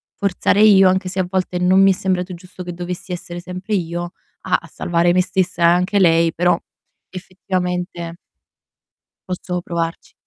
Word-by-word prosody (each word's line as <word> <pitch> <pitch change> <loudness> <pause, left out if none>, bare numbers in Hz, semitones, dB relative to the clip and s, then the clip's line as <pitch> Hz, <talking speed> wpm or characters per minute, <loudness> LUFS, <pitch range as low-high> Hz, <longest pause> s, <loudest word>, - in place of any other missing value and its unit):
forzare 200 +1 +1
io 195 -3 +7
anche 185 0 +1
se 190 +1 -4
a 180 - 0
volte 185 -1 -1
non 185 +2 +4
mi 195 0 +6
è - - +3
sembrato 185 -1 -1
giusto 180 +1 -10
che 175 -1 -6
dovessi 175 +2 -6
essere 175 -1 -5
sempre 185 +4 -6
io 175 0 -3 0.3
a - - +1
a - - -14
salvare 175 0 +1
me 185 +1 +3
stessa 180 -1 -1
e - - +7
anche 180 +4 +3
lei, 165 -2 +4
però 175 0 +2 0.5
effettivamente 180 -2 -4 1.1
posso 180 0 -3
provarci. 170 -1 -4
180 Hz, 165 wpm, -19 LUFS, 175-185 Hz, 1.1 s, io